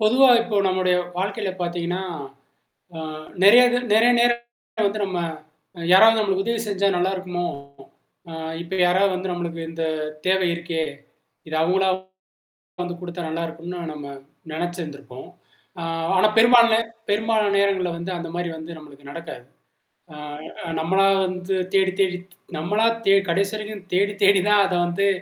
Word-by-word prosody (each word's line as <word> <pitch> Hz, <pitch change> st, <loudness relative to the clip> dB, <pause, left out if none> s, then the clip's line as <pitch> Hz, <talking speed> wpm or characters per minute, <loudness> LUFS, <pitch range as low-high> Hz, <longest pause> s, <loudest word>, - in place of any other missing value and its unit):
பொதுவா 245 Hz, +5 st, +5 dB
இப்போ 230 Hz, -3 st, -3 dB
நம்முடைய 185 Hz, -1 st, +1 dB, 0.2 s
வாழ்க்கையில 200 Hz, +1 st, -2 dB
பாத்தீங்கன்னா, 175 Hz, +1 st, -2 dB, 0.9 s
அ -, -, -7 dB, 0.4 s
நெறைய 220 Hz, +6 st, +8 dB
இது 245 Hz, -, +2 dB, 0.2 s
நெறைய 230 Hz, +2 st, +5 dB
நேரத்துல 235 Hz, -2 st, -1 dB
வந்து 210 Hz, +1 st, -4 dB
நம்ம, 185 Hz, -2 st, -3 dB, 0.6 s
அ -, -, -12 dB
யாராவது 220 Hz, +4 st, +7 dB
நம்மளுக்கு 195 Hz, -2 st, 0 dB
உதவி 230 Hz, -1 st, 0 dB
செஞ்சா 200 Hz, 0 st, +1 dB
நல்லாருக்குமோ! 180 Hz, -1 st, -2 dB, 0.8 s
அ -, -, -8 dB, 0.3 s
இப்ப 180 Hz, +3 st, -5 dB
யாராவது 190 Hz, +2 st, +3 dB
வந்து 185 Hz, 0 st, -3 dB
நம்மளுக்கு 170 Hz, -1 st, -4 dB
இந்த 165 Hz, 0 st, -3 dB, 0.4 s
தேவை 190 Hz, 0 st, +3 dB
இருக்கே, 170 Hz, -1 st, -3 dB, 0.7 s
இது 155 Hz, -, -3 dB
அவுங்களா 190 Hz, +3 st, +2 dB, 0.9 s
வந்து 175 Hz, 0 st, -5 dB
குடுத்தா 175 Hz, -1 st, -6 dB
நல்லாருக்கும்ன்னு, 165 Hz, +2 st, -5 dB
நம்ம 150 Hz, -1 st, -8 dB, 0.5 s
நெனச்சு 175 Hz, +2 st, -3 dB
இருந்திருப்போம். 140 Hz, -4 st, -10 dB, 0.5 s
ஆ -, -, -5 dB, 0.3 s
ஆனா 185 Hz, -, +5 dB
பெரும்பால்ன 235 Hz, -1 st, +6 dB, 0.3 s
பெரும்பாலான 215 Hz, 0 st, +1 dB
நேரங்கள்ல 195 Hz, -3 st, +1 dB
வந்து 170 Hz, +2 st, -5 dB
அந்த 170 Hz, -1 st, -6 dB
மாரி 175 Hz, 0 st, -2 dB
வந்து 160 Hz, +1 st, -9 dB
நம்மளுக்கு 145 Hz, -2 st, -14 dB
நடக்காது. 165 Hz, -5 st, -8 dB, 0.7 s
அ -, -, -11 dB, 0.5 s
அ -, -, -6 dB
நம்மளா 190 Hz, +4 st, +2 dB, 0.2 s
வந்து 180 Hz, +1 st, -3 dB, 0.2 s
தேடி 190 Hz, -1 st, +3 dB
தேடி 185 Hz, -2 st, +2 dB
த் -, -, -20 dB, 0.2 s
நம்மளா 210 Hz, +8 st, +1 dB, 0.2 s
தேடி 195 Hz, 0 st, +5 dB
கடைசி 195 Hz, +4 st, +1 dB
வரைக்கும் 215 Hz, -2 st, -7 dB
தேடி 200 Hz, +2 st, +2 dB
தேடி 195 Hz, -1 st, +6 dB
தான் 210 Hz, -1 st, +5 dB
அத 185 Hz, -, -2 dB
வந்து 175 Hz, +3 st, 0 dB
185 Hz, 145 wpm, -23 LUFS, 170-205 Hz, 0.9 s, நெறைய